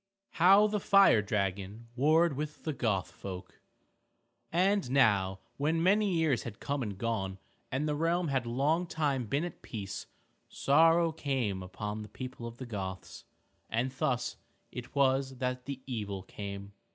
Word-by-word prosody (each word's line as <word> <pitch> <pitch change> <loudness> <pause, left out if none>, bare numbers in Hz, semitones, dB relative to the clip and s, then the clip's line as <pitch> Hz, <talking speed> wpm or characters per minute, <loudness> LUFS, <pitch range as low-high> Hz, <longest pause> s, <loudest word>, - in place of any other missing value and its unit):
II 195 0 -59
HOW 195 +5 +7
THE 210 0 0
FIRE 195 - +6
DRAGON 100 +1 -2
WARRED 155 +4 +4
WITH 150 +2 -5
THE 155 - -2
GOTH 110 -8 -1
FOLK 90 -1 -9 0.9
And 190 -2 +2
now 100 -8 +3 0.2
when 160 +3 +1
many 200 +2 +4
years 160 -6 +2
had 110 -3 -8
come 140 0 -2
and 105 -5 -4
gone 95 -4 -2 0.3
and 135 +4 0
the 150 - +1
realm 165 +2 +1
had 130 -3 0
long 150 +9 +1
time 140 -7 -1
been 140 +7 0
at 175 - -8
peace, 100 -3 -6 0.4
sorrow 165 +3 +4
came 130 -11 -1
upon 105 +3 -5
the 105 - -9
people 130 -2 -7
of 115 0 -9
the 130 - -6
Goths. 95 -5 -6 0.4
And 120 +3 0
thus 125 -2 -1 0.3
it 125 +3 -8
was 135 -1 +2
that 125 0 -2
the 135 -1 -6
evil 105 -6 -4
came. 100 0 -7
130 Hz, 155 wpm, -31 LUFS, 105-160 Hz, 0.9 s, HOW